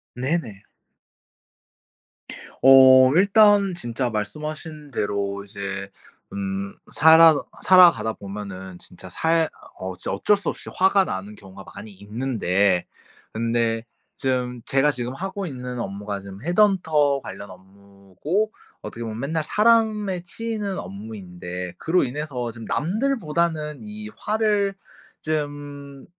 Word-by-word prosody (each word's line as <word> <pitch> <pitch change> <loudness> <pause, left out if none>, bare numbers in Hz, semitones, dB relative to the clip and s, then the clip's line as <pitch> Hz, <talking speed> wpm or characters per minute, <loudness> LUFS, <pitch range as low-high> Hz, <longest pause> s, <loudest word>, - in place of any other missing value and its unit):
네네. 125 - -2 2.0
어 130 -1 +8
일단 200 0 +5
진짜 125 -6 -3
말씀하신 150 +7 -5
대로 100 -3 -2
이제 100 -1 -5 0.4
음 100 0 -4 0.2
살아 160 +1 +7 0.3
살아가다 175 -11 +6
보면은 95 -3 -8
진짜 90 +1 -11
살 165 - +1 0.3
어 95 0 -4 0.2
어쩔 100 - +2
수 200 -3 -3
없이 - - -7
화가 190 +1 +3
나는 100 - -5
경우가 95 -1 -13
많이 110 - -9
있는데 100 -3 0 0.5
근데 115 0 -1 0.3
쫌 125 -2 -2
제가 135 +2 +2
지금 125 -2 -5
하고 195 +4 -4
있는 125 -5 -6
업무가 100 -1 -5
지금 100 +2 -11
헤드헌터 160 -6 +2
관련 100 +2 -8
업무고 100 - -5 0.3
어떻게 115 - -7
보면 110 -1 -5
맨날 160 +4 -1
사람에 210 -4 +2
치이는 210 +1 -4
업무인데 90 -3 -7
그로 175 +3 +1
인해서 130 -3 -4
좀 115 0 -10
남들보다는 170 - -1
이 215 0 -8
화를 210 -2 0 0.5
좀 145 -2 -5
130 Hz, 235 characters per minute, -23 LUFS, -, 2.0 s, 어